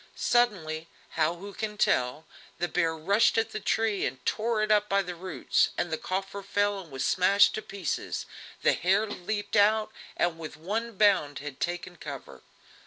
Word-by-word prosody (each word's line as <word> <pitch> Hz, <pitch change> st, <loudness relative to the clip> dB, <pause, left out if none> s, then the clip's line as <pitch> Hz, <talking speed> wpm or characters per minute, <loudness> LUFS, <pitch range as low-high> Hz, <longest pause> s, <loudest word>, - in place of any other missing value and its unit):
Suddenly, 165 Hz, -10 st, +1 dB, 0.2 s
how 160 Hz, +1 st, +1 dB
who 200 Hz, +3 st, -9 dB
can 210 Hz, 0 st, -4 dB
tell, 125 Hz, -2 st, +1 dB, 0.3 s
the 175 Hz, -, -1 dB
bear 165 Hz, -1 st, 0 dB
rushed 200 Hz, +10 st, +3 dB
at 225 Hz, -, +1 dB
the -, -, -4 dB
tree 220 Hz, -1 st, 0 dB
and 125 Hz, 0 st, -4 dB
tore 220 Hz, 0 st, 0 dB
it 215 Hz, -, 0 dB
up 210 Hz, 0 st, +3 dB
by 200 Hz, 0 st, +2 dB
the 180 Hz, -1 st, -5 dB
roots, 170 Hz, -5 st, 0 dB
the 170 Hz, -2 st, 0 dB
coffer 195 Hz, +4 st, -4 dB
fell 205 Hz, +1 st, 0 dB
and 180 Hz, -4 st, -11 dB
was 135 Hz, -1 st, -2 dB
smashed 195 Hz, +2 st, +4 dB
to 215 Hz, -, -3 dB
pieces, 195 Hz, -6 st, -4 dB, 0.4 s
the -, -, +5 dB
hare 195 Hz, +5 st, +2 dB
leaped 205 Hz, +1 st, -4 dB
out, 215 Hz, +1 st, +4 dB, 0.3 s
and 170 Hz, -1 st, 0 dB
with 160 Hz, -2 st, -7 dB
one 215 Hz, +6 st, -3 dB
bound 190 Hz, -9 st, +3 dB
had 145 Hz, -2 st, -7 dB
taken 175 Hz, 0 st, -3 dB
cover. 145 Hz, -4 st, -8 dB
190 Hz, 175 wpm, -28 LUFS, 165-210 Hz, 0.4 s, the